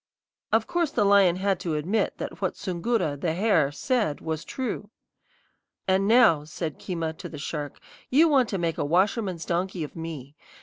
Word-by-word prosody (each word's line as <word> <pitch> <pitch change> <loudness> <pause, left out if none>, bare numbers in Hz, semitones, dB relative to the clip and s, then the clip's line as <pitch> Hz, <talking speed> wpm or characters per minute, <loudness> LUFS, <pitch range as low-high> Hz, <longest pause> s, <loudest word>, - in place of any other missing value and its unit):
"Of 225 0 +3
course 345 -3 0
the 230 - +1
lion 200 -3 +5
had 190 0 0
to 165 -3 -2
admit 180 +9 0
that - - -6
what - - -1
Soongoora, 180 -4 -1
the 160 +2 -1
hare, 180 -8 +2
said 210 - 0
was 160 0 -4
true. 230 -5 -4 1.0
"And 190 +1 +2
now," 220 -10 +5
said 155 0 -5
Keema 165 -3 -3
to - - -7
the 155 - -8
shark, 145 0 -5 0.3
"you 305 +6 +5
want 270 -6 +3
to 195 - -1
make 165 -2 -2
a - - +1
washerman's 185 +2 +1
donkey 180 0 -1
of 150 - -8
me. 155 -4 -7
180 Hz, 175 wpm, -26 LUFS, 160-215 Hz, 1.0 s, lion